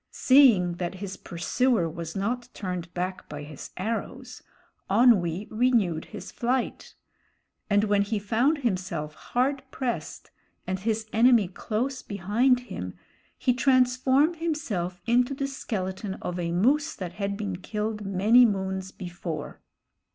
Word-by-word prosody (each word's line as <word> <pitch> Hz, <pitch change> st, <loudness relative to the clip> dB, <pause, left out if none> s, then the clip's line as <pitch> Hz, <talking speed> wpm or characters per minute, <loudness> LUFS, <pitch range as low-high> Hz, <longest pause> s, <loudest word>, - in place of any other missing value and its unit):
Seeing 230 Hz, -11 st, +5 dB
that 175 Hz, +1 st, -3 dB
his 190 Hz, 0 st, -6 dB
pursuer 195 Hz, +3 st, 0 dB
was 165 Hz, 0 st, -6 dB
not 235 Hz, +5 st, -2 dB
turned 180 Hz, -3 st, -4 dB
back 185 Hz, +1 st, -4 dB
by 150 Hz, 0 st, -6 dB
his 145 Hz, -1 st, -9 dB
arrows, 220 Hz, +5 st, -4 dB, 0.5 s
Onwee 200 Hz, -4 st, +4 dB
renewed 215 Hz, -9 st, +2 dB
his 210 Hz, -, -9 dB
flight; 245 Hz, +1 st, -2 dB, 0.7 s
and 205 Hz, 0 st, +4 dB
when 205 Hz, -1 st, +3 dB
he 205 Hz, +2 st, -1 dB
found 230 Hz, +9 st, +1 dB
himself 185 Hz, -, -2 dB
hard 260 Hz, -, -1 dB
pressed 255 Hz, -2 st, -4 dB, 0.3 s
and 185 Hz, 0 st, -2 dB
his 220 Hz, +2 st, -1 dB
enemy 230 Hz, -3 st, +5 dB
close 245 Hz, +8 st, -3 dB
behind 220 Hz, +6 st, +1 dB
him, 250 Hz, -, -7 dB, 0.4 s
he 250 Hz, -, +2 dB
transformed 260 Hz, +4 st, +3 dB
himself 230 Hz, -, -2 dB
into 245 Hz, +3 st, +2 dB
the 275 Hz, -, -2 dB
skeleton 195 Hz, -7 st, -4 dB
of 180 Hz, 0 st, -5 dB
a 170 Hz, -1 st, -2 dB
moose 280 Hz, -, +2 dB
that 180 Hz, -2 st, -6 dB
had 200 Hz, 0 st, -1 dB
been 200 Hz, -4 st, -3 dB
killed 210 Hz, +2 st, -3 dB
many 205 Hz, +5 st, +5 dB
moons 190 Hz, -3 st, 0 dB
before. 175 Hz, -5 st, -6 dB
210 Hz, 130 wpm, -27 LUFS, 185-250 Hz, 0.7 s, Seeing